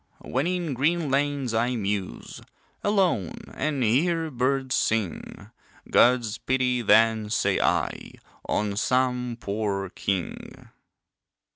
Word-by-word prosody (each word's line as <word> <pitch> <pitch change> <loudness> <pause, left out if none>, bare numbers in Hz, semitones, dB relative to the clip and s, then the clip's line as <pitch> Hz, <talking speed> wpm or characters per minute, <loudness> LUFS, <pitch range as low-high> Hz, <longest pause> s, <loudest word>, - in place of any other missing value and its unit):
When 135 +6 -1
in 175 -4 -1
green 150 +3 0
lanes 140 -3 0
I 120 +3 +1
muse, 100 - -4 0.4
Alone, 185 - +1
and 145 -4 -1
hear 160 +8 +1
birds 130 +1 0
sing, 110 -8 -2 0.4
God's 120 -3 +3
pity 125 -1 0
then, 110 -1 +4
say - - +1
I, - - -1 0.4
On 105 -1 0
some 125 +1 0
poor 100 -3 -2
king. 95 -4 -4
125 Hz, 105 wpm, -25 LUFS, 110-140 Hz, 0.4 s, then